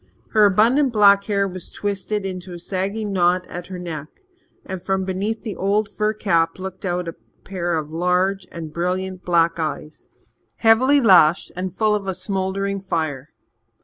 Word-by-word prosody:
Her 215 -2 +6
abundant 240 +8 +3
black 200 -2 +5
hair 200 -2 +1
was 185 -2 -6
twisted 205 0 -3
into 185 -1 -6
a - - -8
sagging 200 +4 -3
knot 180 0 +2
at 175 0 -8
her 185 - -7
neck, 160 -4 -6 0.6
and 190 -1 -6
from 190 +1 -1
beneath 200 +4 -3
the 220 -4 -5
old 205 +2 +1
fur 210 +1 -1
cap 165 -6 +1
looked 190 +1 -7
out 180 -1 -2
a 165 - -4 0.3
pair 175 -3 -2
of 155 -1 -3
large 180 +3 0
and 160 -2 -7
brilliant 185 +2 -2
black 170 -1 +2
eyes, 155 -1 -5 0.5
heavily 255 +6 +4
lashed, 180 -7 +5
and 185 +1 -3
full 215 -1 +2
of 205 -2 -2
a 190 - -2
smouldering 195 +1 -2
fire. 155 -6 -3
190 Hz, 165 wpm, -21 LUFS, 175-200 Hz, 0.6 s, Her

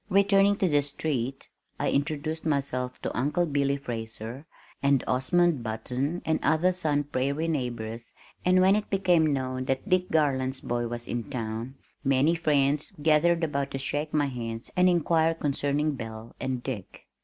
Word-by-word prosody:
Returning 200 +1 +4
to 195 - +1
the 145 -3 +3
street, 140 -3 -3 0.3
I - - +1
introduced 155 +2 -1
myself 135 -4 -1
to - - -3
Uncle 145 +8 +1
Billy 140 -2 +1
Fraser 115 +2 -6 0.3
and 140 -2 +3
Osmund 150 +4 +2
Button 125 +9 -3
and 160 0 +1
other 165 +4 +3
Sun 150 -5 0
Prairie 140 +3 -1
neighbors 120 -6 -3 0.3
and 185 +1 +4
when 190 +2 +5
it 210 0 -2
became 175 -5 +3
known 130 -1 -2
that 135 +6 -2
"Dick 185 -2 +2
Garland's 130 -4 +1
boy" 120 0 -2
was 120 0 -5
in 120 -3 -4
town, 115 +2 -4 0.3
many 135 +4 +3
friends 150 -3 +1
gathered 160 +3 +3
about 140 -3 -1
to 135 - -4
shake 145 +3 -2
my 150 -1 +2
hand 115 -3 -4
and 180 0 +5
inquire 165 -1 +2
concerning 145 0 0
"Belle" 110 -2 -8
and 130 -2 -3
"Dick." 110 -8 -6
140 Hz, 155 wpm, -27 LUFS, 125-160 Hz, 0.3 s, when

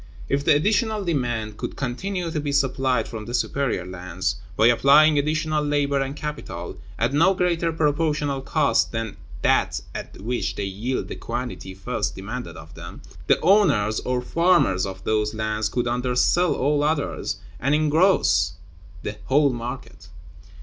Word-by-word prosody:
If 140 +1 0
the 145 - +5
additional 210 +5 +1
demand 120 -9 -2
could - - -5
continue 170 +7 -3
to 155 - -2
be 145 -1 -2
supplied 130 -4 +1
from 110 -2 -7
the 120 - -2
superior 135 -12 -1
lands, 90 +1 -3 0.2
by 110 - +4
applying 145 +5 +6
additional 155 +1 0
labor 145 -1 +1
and 135 +1 -3
capital, 140 - -6 0.2
at - - 0
no 175 +6 +4
greater 170 -2 +1
proportional 150 -2 0
cost - - +1
than 115 -2 -4 0.3
that - - +2
at - - -8
which 120 +4 -2
they 100 - -3
yield 105 +7 -3
the - - -6
quantity 120 -5 -5
first 95 - -3
demanded 115 +6 -6
of 80 0 -12
them, - - -10 0.2
the - - +4
owners 155 - +3
or 125 -1 -2
farmers 165 - +2
of 95 0 -8
those 105 0 0
lands 110 0 -1
could 120 -1 -1
undersell 125 +8 +2
all 145 +2 +1
others, 150 -1 -1 0.2
and 140 +3 +2
engross 155 +5 +3 0.5
the 105 0 -5
whole 140 +3 +3
market. 115 -6 -7
135 Hz, 150 wpm, -23 LUFS, 110-155 Hz, 0.5 s, applying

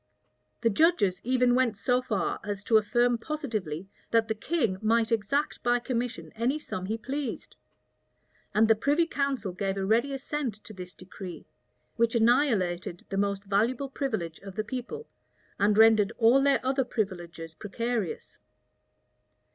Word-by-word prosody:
The 230 -1 +3
judges 205 - +3
even 250 0 +3
went 245 -4 +2
so 250 +2 +1
far 215 -6 -1
as 205 -2 -4
to 225 - +5
affirm 240 +3 +2
positively, 215 - -4 0.2
that 230 -1 +3
the 220 - 0
king 220 - -1
might 225 +1 +2
exact 245 +7 0
by 240 0 +3
commission 245 0 -3
any 235 +6 0
sum 185 -11 -5
he 220 +2 -1
pleased; 270 +2 -5 1.0
and 220 +1 +4
the 225 - +7
privy 290 +9 +2
council 275 - -1
gave 195 +1 -2
a 195 - -1
ready 230 +7 +2
assent 270 -3 -3
to 215 - -10
this 180 -2 -9
decree, 185 -2 -9 0.5
which 235 0 +2
annihilated 220 - +2
the 195 - -3
most 200 0 0
valuable 230 +7 0
privilege 220 - -3
of 195 -1 -10
the 215 - -1
people, 260 - -6 0.5
and 205 +1 +3
rendered 220 -2 +6
all 240 +4 +5
their 275 -2 +2
other 265 +1 +2
privileges 175 -8 -4
precarious. 220 +1 -4
225 Hz, 145 wpm, -28 LUFS, 200-255 Hz, 1.0 s, the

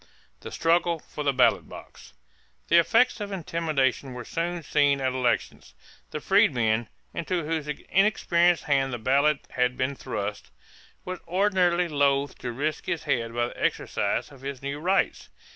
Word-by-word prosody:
=The - - -9
Struggle 170 +1 +2
for 150 -1 -7
the 140 - +2
Ballot 130 -2 +2
Box.= 65 - -12 0.6
The 170 - +7
effects 230 +6 +3
of 205 -1 -4
intimidation 155 -7 -1
were 120 -1 -7
soon 170 0 -3
seen 145 -2 +2
at 130 -1 0
elections. 120 - -2 0.3
The - - -4
freedman, 110 -2 +2 0.2
into 170 0 -2
whose 160 -1 -2
inexperienced 175 +1 +2
hand 135 -2 +1
the - - -2
ballot 140 +5 +2
had 125 0 0
been 130 +2 0
thrust, 105 - -5 0.6
was 185 -1 -5
ordinarily 180 -1 +2
loath 140 -2 +1
to 120 - -4
risk 145 +5 -3
his 165 - -2
head 120 -5 -1
by 120 0 0
the - - -8
exercise - - -1
of 135 -2 -15
his 135 -1 -6
new 140 +1 -4
rights. 185 +5 0
145 Hz, 155 wpm, -26 LUFS, 130-170 Hz, 0.6 s, The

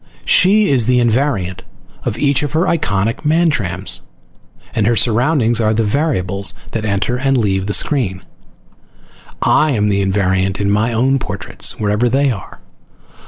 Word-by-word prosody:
She 205 +3 +4
is 125 -5 +2
the 125 0 +3
invariant 115 -6 0 0.4
of 105 - -2
each 140 +1 +1
of 145 -1 -4
her 165 +3 +1
iconic 115 - -1
Mantrams 110 - -1 0.7
and 105 -2 0
her 120 - +2
surroundings 120 0 +2
are 110 0 +1
the 115 - +1
variables 105 - 0 0.2
that 110 -1 -3
enter 100 +4 -1
and 135 +1 +1
leave 95 -4 0
the 105 - -1
screen. 95 -2 0 1.2
I 155 - +3
am 105 -3 +1
the 100 -1 +1
invariant 95 0 0
in 100 0 0
my 110 +3 +1
own 130 +4 +1
portraits, - - -2
wherever 105 +3 +1
they 135 +2 +2
are. 100 -6 -9
115 Hz, 150 wpm, -16 LUFS, 100-135 Hz, 1.2 s, She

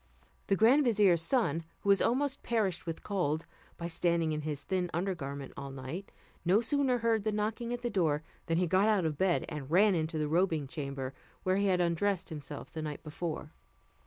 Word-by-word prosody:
The 195 - +3
grand 240 +9 +5
vizier's 205 - +4
son, 165 - +1 0.2
who 200 - -1
was 200 -1 +5
almost 275 +4 +1
perished 205 -8 0
with 165 - -4
cold, 165 -6 -1 0.3
by 170 - -4
standing 170 -1 +1
in 155 0 -2
his 150 -2 -4
thin 185 -2 -1
under 190 +3 0
garment 140 -4 -6
all 140 0 -6
night, 135 +8 -6 0.3
no 185 +4 +4
sooner 265 +1 +2
heard 230 -2 +2
the 215 +1 0
knocking 220 +3 -2
at 245 0 -4
the 240 - 0
door 155 -5 +1 0.2
than 165 -1 +1
he 180 - +3
got 190 +4 +3
out 205 -5 +3
of 150 -3 -2
bed, 190 -2 +2
and 145 -3 -6
ran 195 +5 +5
into 160 -1 -1
the 150 -1 0
robing 160 -2 +2
chamber, 135 -1 -4 0.3
where 185 +1 +2
he 200 0 +2
had 180 -2 +3
undressed 175 +2 0
himself 150 -2 -7
the 160 - -5
night 150 -2 -5
before. 160 +1 -5
175 Hz, 200 wpm, -31 LUFS, 155-205 Hz, 0.3 s, grand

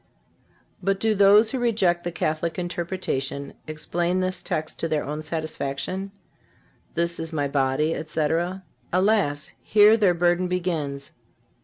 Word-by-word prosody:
But 195 +1 0
do 220 +1 +2
those 205 +2 +6
who 265 - -2
reject 195 -8 +2
the 175 - -3
Catholic 160 0 -2
interpretation 170 -6 -3
explain 170 +3 -1
this 185 0 -1
text 155 0 -3
to 165 - -1
their 155 -2 0
own 150 +2 -4
satisfaction: 155 +4 -3 0.8
"This 170 0 0
is 165 0 -3
My 145 -3 0
body, 140 +3 +1
etc?" 165 +4 -1 0.3
Alas! 185 -6 +1
here 210 +1 +6
their 195 -5 +3
burden 175 +1 +2
begins. 160 -6 -2
170 Hz, 130 wpm, -24 LUFS, 155-185 Hz, 0.8 s, those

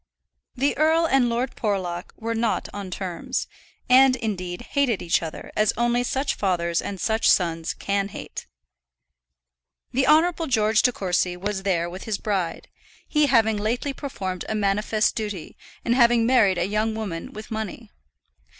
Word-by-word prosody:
The 275 +3 +1
earl 320 +2 +4
and 270 -5 +3
Lord 240 +3 -2
Porlock 185 -5 -2
were 230 +1 -3
not 230 0 0
on 200 -2 -6
terms, 180 -1 -3 0.4
and 260 +1 +6
indeed 185 -7 -4
hated 270 -7 +2
each 170 - +1
other 160 -2 -7
as 215 -1 +2
only 240 +1 +2
such 270 +3 -1
fathers 170 -3 0
and 195 -2 -5
such 220 +4 +2
sons 165 -2 +1
can 200 0 -1
hate. 195 - -8 1.4
The 260 +1 +1
Honourable 325 +2 +4
George 220 -3 +3
De 250 - +3
Courcy 180 -4 -1
was 195 +1 -3
there 180 -3 0
with 180 +2 -8
his 220 -3 -1
bride, 190 -5 -2 0.4
he 300 -1 +3
having 220 -5 +3
lately 235 +7 -1
performed 190 - -5
a 220 - -1
manifest 210 +1 +1
duty, 205 -6 -5 0.3
in 235 - +2
having 240 -2 +4
married 225 -7 +4
a 175 - +1
young 215 +2 0
woman 195 -7 -5
with 215 +1 -10
money. 220 0 -5
215 Hz, 155 wpm, -24 LUFS, 190-240 Hz, 1.4 s, and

